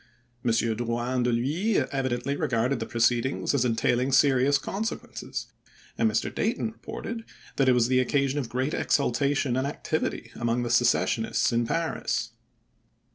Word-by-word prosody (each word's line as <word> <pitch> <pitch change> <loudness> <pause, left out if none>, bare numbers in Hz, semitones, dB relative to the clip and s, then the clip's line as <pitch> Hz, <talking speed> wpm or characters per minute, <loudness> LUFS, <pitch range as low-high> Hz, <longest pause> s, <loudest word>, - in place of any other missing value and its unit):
M. 120 - +1
Drouyn 120 +2 0
de 125 0 +2
PHuys 155 - +1
evidently 130 0 -1
regarded 125 0 0
the 110 - -4
proceed 120 0 +2
ings 135 - -2
as 140 -4 +2
entailing 120 +2 +1
serious 135 +1 +4
consequences; 215 +8 -5 0.5
and 225 - +2
Mr. - - -1
Dayton 225 0 -1
reported 225 +1 -7 0.3
that 135 -2 +4
it - - +6
was 120 -1 +3
the 130 0 +3
occasion 140 +2 +1
of 125 -5 -4
great 130 +5 -1
exultation 140 -1 +1
and 130 +1 0
activity 145 -5 -3
among 120 +1 -1
the 120 - -2
secessionists 120 0 +2
in 115 0 +1
Paris. 165 +4 -1
130 Hz, 145 wpm, -27 LUFS, 120-140 Hz, 0.5 s, it